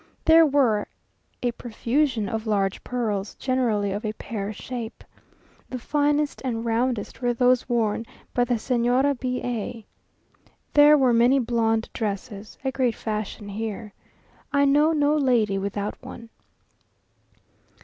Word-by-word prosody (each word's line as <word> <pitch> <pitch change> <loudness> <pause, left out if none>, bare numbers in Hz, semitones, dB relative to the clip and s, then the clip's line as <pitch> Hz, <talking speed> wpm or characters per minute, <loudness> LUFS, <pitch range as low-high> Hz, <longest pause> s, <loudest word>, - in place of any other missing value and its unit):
There 325 0 +7
were 255 -8 +2 0.6
a 245 - +1
profusion 235 0 -1
of 220 +2 -4
large 195 -2 0
pearls, 215 -5 -2
generally 235 -6 0
of 205 +3 -4
a 215 -1 -2
pear 210 -2 -5
shape. 235 +1 -7 0.7
The 255 - -4
finest 290 +3 0
and 235 -3 -2
roundest 235 0 -1
were 245 -1 +1
those 250 +1 +2
worn 225 -1 0 0.3
by 245 - +2
the 245 0 +1
Señora 250 +4 +1
B 250 -1 -2
a. 235 -2 -4 0.9
There 295 +1 +7
were 260 -3 +3
many 240 +4 +4
blonde 230 -3 +1
dresses, 210 0 -5
a 265 - +1
great 255 -4 0
fashion 215 -1 -4
here. 210 0 -5 0.6
I 280 -1 +3
know 295 +3 +4
no 295 -1 +2
lady 235 -9 +2
without 200 +1 -4
one. 230 -1 -10
235 Hz, 130 wpm, -24 LUFS, 215-260 Hz, 0.9 s, There